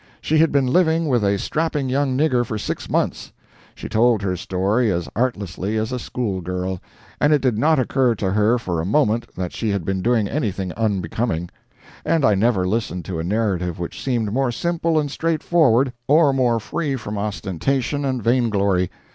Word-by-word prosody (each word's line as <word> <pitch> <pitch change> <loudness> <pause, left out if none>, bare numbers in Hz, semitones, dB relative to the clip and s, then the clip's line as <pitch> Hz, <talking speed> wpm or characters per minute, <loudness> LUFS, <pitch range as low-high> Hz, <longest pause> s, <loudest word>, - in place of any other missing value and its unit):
She 155 0 +1
had 160 -1 +4
been 140 -2 +2
living 165 +4 +2
with 125 -6 +2
a 100 0 +2
strapping 150 +3 -1
young 130 0 0
nigger 130 -5 +2
for 110 -2 -4
six 105 - -4
months! - - -1 0.4
She - - -7
told 115 -2 +2
her 95 -2 0
story 100 +6 0
as 85 -4 -2
artlessly 105 -3 -2
as 110 +2 -1
a 125 - -2
school 105 -7 -3
girl, 90 +1 -3 0.4
and 145 - +3
it 150 - +5
did 130 -4 +1
not 155 +4 +3
occur 130 -1 +2
to 95 -2 -2
her 105 +4 +3
for 90 -8 -2
a - - -3
moment 115 - +1
that 90 -1 -4
she 110 - -2
had 100 -5 -1
been 95 -1 -1
doing 115 -1 +2
anything 100 -8 -2
unbecoming; 100 -3 -2 0.5
and 160 -3 +2
I 105 - +5
never 100 -2 +2
listened 90 -5 -2
to 85 -2 -4
a - - -2
narrative 90 -3 -1
which 85 - -6
seemed 115 -6 -1
more 135 0 +1
simple 170 +3 0
and 145 -2 0
straightforward, 155 -6 +2
or 150 -1 +5
more 125 -3 +2
free 145 +5 -2
from 105 -4 -5
ostentation 110 - -2
and 130 -4 -2
vain 120 +1 +2
glory. 100 -3 +1
115 Hz, 190 wpm, -21 LUFS, 95-135 Hz, 0.5 s, it